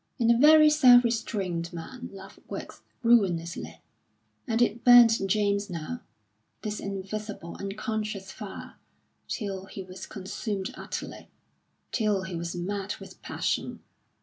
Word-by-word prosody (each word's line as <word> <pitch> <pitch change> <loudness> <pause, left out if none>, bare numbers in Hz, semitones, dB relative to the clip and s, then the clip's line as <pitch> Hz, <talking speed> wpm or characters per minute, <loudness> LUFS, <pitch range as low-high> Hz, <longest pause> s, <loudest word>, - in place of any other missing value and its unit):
In 235 -1 +4
a 235 - +4
very 305 +2 +8
self 255 -5 +7
restrained 195 -7 -2
man 250 +9 -7
love 195 0 -12
works - - -7 0.2
ruinously; 170 - +1 0.7
and 225 0 0
it 235 -1 +1
burnt 240 -3 +8
James 200 0 +1
now, 180 +8 -5 0.6
this 210 -1 -3
invisible, 200 -2 -5
unconscious 210 -1 -4
fire, - - -9 0.5
till 195 -4 -4
he 195 - -7
was 185 0 -9
consumed 195 0 -4
utterly - - -7 0.6
till 210 -4 +1
he 190 -2 -5
was 170 +1 -4
mad 195 +3 -3
with - - -12
passion. - - -2
205 Hz, 120 wpm, -28 LUFS, 190-230 Hz, 0.7 s, very